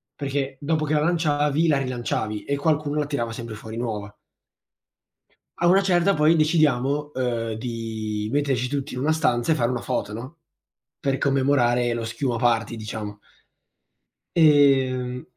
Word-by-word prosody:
Perché 140 -1 -3
dopo 155 +1 0
che 150 - -1
la 150 - +3
lanciavi, 150 -1 +1
la 150 -3 +3
rilanciavi 120 -5 -3
e 140 - -1
qualcuno 150 0 0
la 150 - 0
tirava 120 -6 -2
sempre 115 -1 -7
fuori 110 +1 -8
nuova. 105 -4 -4 1.4
A 175 - +3
una 190 +3 +5
certa 185 0 +3
poi 155 +2 +4
decidiamo, 150 -2 +1
ehm, 120 -3 -2
di 110 -2 -4
metterci 135 -3 0
tutti 140 +2 -4
in 125 - -4
una 145 +4 +1
stanza 135 -4 +1
e - - +4
fare 120 -5 +1
una 125 -2 -2
foto 105 - -3
no, 130 +9 -8 0.6
per 135 -1 0
commemorare 130 -3 +2
lo 115 -1 -3
schiuma 120 +2 -2
party, 115 -2 +1
diciamo 105 -1 -6 1.2
ehm, 135 -5 +3
130 Hz, 150 wpm, -24 LUFS, 115-150 Hz, 1.4 s, una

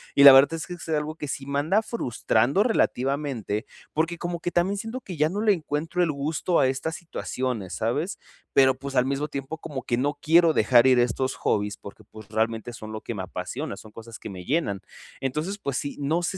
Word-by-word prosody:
y 140 - +6
la 140 - +14
verdad 135 +4 +7
es 160 - -5
que 180 - -6
es 170 - -9
es 160 - +1
algo 150 +1 -2
que 150 - -6
sí 135 - -4
me 140 0 -1
anda 190 +9 +2
frustrando 135 - +1
relativamente, 135 - 0 0.3
porque, 165 +2 0
como 175 0 -3
que 175 - -3
también 190 +4 +1
siento 225 +5 -4
que 180 - -7
ya 155 +1 +3
no 205 +4 -2
le 215 -2 +4
encuentro 165 +2 -1
el 165 - +1
gusto 150 +5 0
a 130 - +4
estas 135 +5 -2
situaciones, 125 - -4
¿sabes? 145 - -1 0.3
Pero 130 -1 +5
pues, 140 0 -7
al 125 - +4
mismo 140 +2 -1
tiempo, 140 +3 -5
como 150 -4 -6
que 120 - 0
no 145 +3 0
quiero 165 0 +5
dejar 125 0 +5
ir 130 - +5
estos 125 +2 0
hobbies 105 0 -1
porque, 100 - -12
pues 110 -2 -13
realmente 115 +2 -1
son 110 -1 -8
lo 110 - -6
que 115 - -5
me 95 - -4
apasiona. 125 +12 -5
Son 110 - -12
cosas 115 +1 -10
que - - -7
me 90 -1 -9
llenan. 130 - 0 0.4
Entonces 155 +10 -2
pues 140 -6 -2
sí, 145 - -3
no 160 +5 0
sé 190 +2 -2
140 Hz, 225 wpm, -25 LUFS, 120-165 Hz, 0.4 s, la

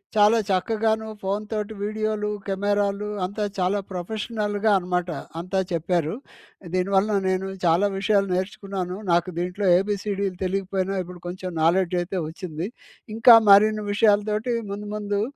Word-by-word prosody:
చాలా 215 +2 +5
చక్కగాను 220 +3 0
ఫోన్‌తోటి 210 +2 -3
వీడియోలు, 215 0 -1 0.2
కెమెరాలు 205 +1 0 0.2
అంతా 205 +3 -4
చాలా 185 +2 +1
ప్రొఫెషనల్‌గా 210 +2 -2
అనమాట 180 -1 -2 0.3
అంతా 185 +3 -2
చెప్పారు. 170 0 0 0.6
దీనివల్ల 195 +3 +2 0.2
నేను 185 +1 -1 0.2
చాలా 175 +5 +4
విషయాలు 200 0 +2
నేర్చుకున్నాను. 190 -1 -4
నాకు 175 +1 +2
దీంట్లో 180 +3 -2
ఏబీసీడీలు 200 -1 -2
తెలియకపోయినా, 195 0 -1
ఇప్పుడు 180 0 -11
కొంచెం 185 +1 -5
నాలెడ్జ్ 180 +2 +2
అయితే 180 +1 -3
వచ్చింది. 165 +1 -5 0.5
ఇంకా 230 +1 +9 0.2
మరిన్ని 215 +1 +5
విషయాలతోటి 210 +2 +2 0.2
ముందు 205 +1 -6
ముందు 205 -1 -1
200 Hz, 115 wpm, -24 LUFS, 185-210 Hz, 0.6 s, ఇంకా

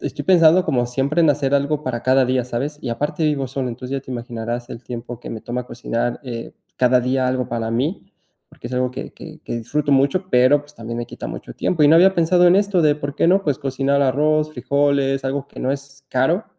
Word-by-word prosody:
estoy - - -5
pensando 175 -1 +5
como 120 -2 0
siempre 135 +6 0
en 160 - +5
hacer 140 -1 0
algo 140 +1 0
para 120 -4 -3
cada 130 0 +4
día, 125 -1 0
¿sabes?, 135 +5 -4
y 130 - -5
aparte 145 +7 -2
vivo 145 -3 0
solo. 130 0 -3
Entonces 125 +3 -5
ya - - -9
te 130 - -13
imaginarás 120 0 -5
el 120 0 -8
tiempo 120 0 -7
que - - -8
me 110 - -6
toma 125 +2 -5
cocinar, 120 0 -3
eh, 120 -3 -7 0.2
cada 125 0 +4
día 130 +1 0
algo 125 -1 -1
para 115 -1 -3
mí, 135 +11 -2 0.4
porque - - -10
es 125 - -10
algo 125 0 0
que 125 - -7
que - - -12
que - - -4
disfruto 140 +5 -1
mucho, 140 +8 +2
pero, 130 +4 +5
pues, 145 0 -20
también 115 -1 -6
me 120 - -4
quita - - -8
mucho - - -8
tiempo. 160 -4 0
Y 145 - +6
no 160 - +7
había 190 +3 +6
pensado 175 +1 +4
en 180 +2 +6
esto 200 -3 +2
de, 150 -1 +4
¿por 145 -1 -5
qué 155 - +2
no? 195 +2 +4
Pues, 145 -7 -1
cocinar 135 0 0
arroz, 150 +3 +2
frijoles, 140 0 0
algo 140 +1 -2
que - - -11
no 130 - 0
es 140 0 -9
caro. 160 - +1
135 Hz, 235 wpm, -20 LUFS, 125-150 Hz, 0.4 s, no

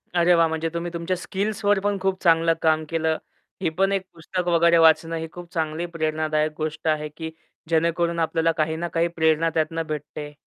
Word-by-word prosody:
अरे, 175 +1 +5
वाह! 165 -1 +4
म्हणजे 160 0 -2
तुम्ही 170 0 -3
तुमच्या 170 +2 -2
स्किल्सवर 205 +1 0
पण 205 0 0
खूप 190 -1 -1
चांगलं 165 -1 +4
काम 160 -1 +3
केलं. 160 -1 0 0.4
ही 170 - +1
पण 195 +4 +1
एक 195 -1 +1
पुस्तक 180 +2 -4
वगैरे 170 0 +4
वाचणं 165 0 +4
ही 160 0 -4
खूप 175 0 -11
चांगली 160 +1 -2
प्रेरणादायक 155 -1 0
गोष्ट 155 +1 -4
आहे 150 -1 0
की 160 -1 -5 0.4
जेणेकरून 170 +1 +1
आपल्याला 165 0 +1
काही 160 +1 0
ना 170 +2 -3
काही 170 0 +1
प्रेरणा 160 -1 +2
त्यातन 160 +1 0
भेटते. 150 0 -6
165 Hz, 185 wpm, -24 LUFS, 160-170 Hz, 0.4 s, अरे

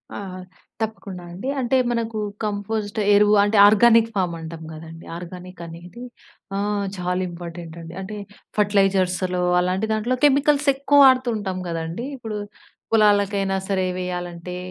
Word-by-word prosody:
ఆ! - - -4 0.6
తప్పకుండా 205 -4 -5
అండి. 190 +10 -5
అంటే 260 +1 +2
మనకు 230 -2 -2 0.3
కంపోస్ట్ 210 0 -2
ఎరువు 210 +1 +5
అంటే 205 +1 +1
ఆర్గానిక్ 230 +2 +5
ఫామ్ 180 -3 0
అంటాం 160 0 -8
కదండీ. 165 +1 -10
ఆర్గానిక్ 180 0 -9
అనేది 175 +8 -10 0.5
ఆహ్, 205 0 -1
చాలా 180 +1 -1
ఇంపార్టెంట్ 170 -1 -8
అండి. 165 0 -9
అంటే 200 +3 -6 0.4
ఫెర్టిలైజర్స్‌లో 190 -3 +2 0.2
అలాంటి 185 +4 0
దాంట్లో 220 +4 0
కెమికల్స్ 285 +1 +3
ఎక్కువ 285 +1 +3
వాడుతుంటాం 235 -8 +2
గదండీ. 165 +7 -4
ఇప్పుడు 220 -4 -5 0.5
పొలాలకైనా 205 -3 +3
సరే 190 -2 +1
వేయాలంటే, 180 -1 -5
200 Hz, 120 wpm, -22 LUFS, 180-220 Hz, 0.6 s, ఎరువు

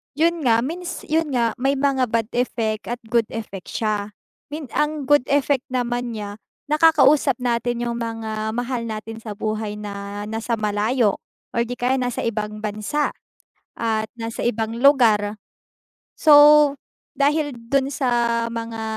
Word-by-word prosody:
'Yun 325 -3 +1
nga, 230 +1 +4
means, 350 +5 -5
'yun 320 0 +1
nga, 230 -2 +2
may 270 +2 +2
mga 270 -2 +1
bad 225 0 -1
effect 225 -3 -1
at 240 0 -5
good 235 -2 +3
effect 205 -4 -7
siya. 210 -2 -2 0.3
Mean, 295 -3 -7
ang 300 -1 0
good 290 -1 +3
effect 280 -2 +1
naman 245 -2 -2
niya 205 0 -6 0.3
nakakausap 300 -3 +4
natin 240 -1 -1
yung 235 0 -3
mga 220 -1 -3
mahal 240 0 -3
natin 220 +1 -6
sa 210 -3 -7
buhay 215 -1 -3
na 205 0 -6
nasa 225 +2 -2
malayo, 210 +1 +1 0.3
or 235 - +1
'di 245 - -4
kaya 250 +2 +1
nasa 245 -1 -2
ibang 215 -1 -3
bansa 215 +8 -1 0.7
at 220 -1 -1
nasa 225 0 -4
ibang 225 -1 -1
lugar. 220 -7 +4 0.8
So 295 -1 +7 0.4
dahil 290 0 +1
dun 265 +4 0
sa 240 -4 +1
mga 230 -1 -5
235 Hz, 140 wpm, -22 LUFS, 220-275 Hz, 0.8 s, So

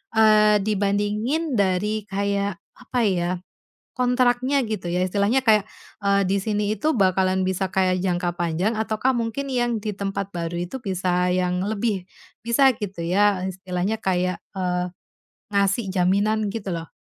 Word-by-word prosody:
eee, 215 -1 +6
dibandingin 210 +8 0
dari 200 +2 0
kayak, 200 -1 -1 0.2
apa 250 -1 -2
ya, 180 -3 +1 0.7
kontraknya, 250 +2 +2
gitu 215 -5 -4
ya, 180 +1 0
istilahnya 205 +7 +1
kayak, 215 -4 +4 0.4
eee, 200 0 +3
di 195 +1 +2
sini 210 0 -1
itu 310 +1 +1
bakalan 190 -1 +2
bisa 190 +1 0
kayak 185 -1 +2
jangka 175 -2 0
panjang 175 +6 0
ataukah 220 +4 0
mungkin 240 +4 -2
yang 240 -2 0
di 215 - -2
tempat 195 -1 -3
baru 170 0 -3
itu 265 - -5
bisa 180 -3 0
yang 180 0 0
lebih 205 -3 -1 0.4
bisa, 250 +4 +5
gitu 195 -4 -5
ya, 195 +2 +2
istilahnya 190 +3 -3
kayak, 180 -1 0 0.2
eee, 180 -1 -1 0.7
ngasih 200 +2 +2
jaminan, 205 +4 +2
gitu 220 -4 -4
loh? 165 -1 -6
200 Hz, 140 wpm, -23 LUFS, 185-220 Hz, 0.7 s, eee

